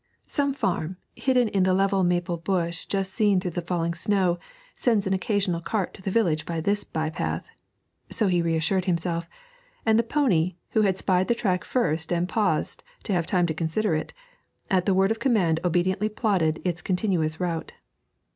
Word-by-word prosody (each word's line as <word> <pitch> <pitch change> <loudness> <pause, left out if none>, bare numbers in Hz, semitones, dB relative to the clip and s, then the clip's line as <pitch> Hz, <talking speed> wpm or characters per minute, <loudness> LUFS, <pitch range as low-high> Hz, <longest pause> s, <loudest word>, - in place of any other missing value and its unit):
'Some 280 -2 0
farm, 180 - -1 0.2
hidden 250 -3 +2
in 195 - +1
the 185 0 +3
level 195 0 +2
maple 175 0 +1
bush 170 -1 -2
just 195 -1 -2
seen 205 -4 +3
through 180 -1 -3
the 175 - -3
falling 170 -1 -1
snow, 180 -1 +1 0.4
sends 220 -5 +1
an 190 - +1
occasional 190 -3 0
cart 195 +1 -2
to - - -8
the 195 - -3
village 180 -8 +1
by 165 -1 -3
this 200 +5 +1
by 160 0 -3
path,' - - -3 0.6
so 220 - +1
he 180 -3 +2
reassured 165 +3 +1
himself; 170 -2 -1 0.6
and 220 0 +4
the - - +6
pony, 220 - +1 0.2
who 220 - +3
had 195 -3 +2
spied 185 -1 +2
the 235 - +2
track 185 -6 0
first 160 -10 -1
and 175 0 +1
paused 185 -7 0 0.2
to 205 - -2
have 170 -3 0
time 180 -2 +2
to 160 - -1
consider 165 +5 0
it, 155 - -2 0.6
at 185 0 +2
the 195 - +4
word 195 +2 +3
of 225 - -1
command 200 -11 +2
obediently 185 +4 +1
plodded 190 -8 +1
its 175 -1 -1
continuous 180 -5 0
route. 170 -3 -3
185 Hz, 185 wpm, -25 LUFS, 170-205 Hz, 0.6 s, the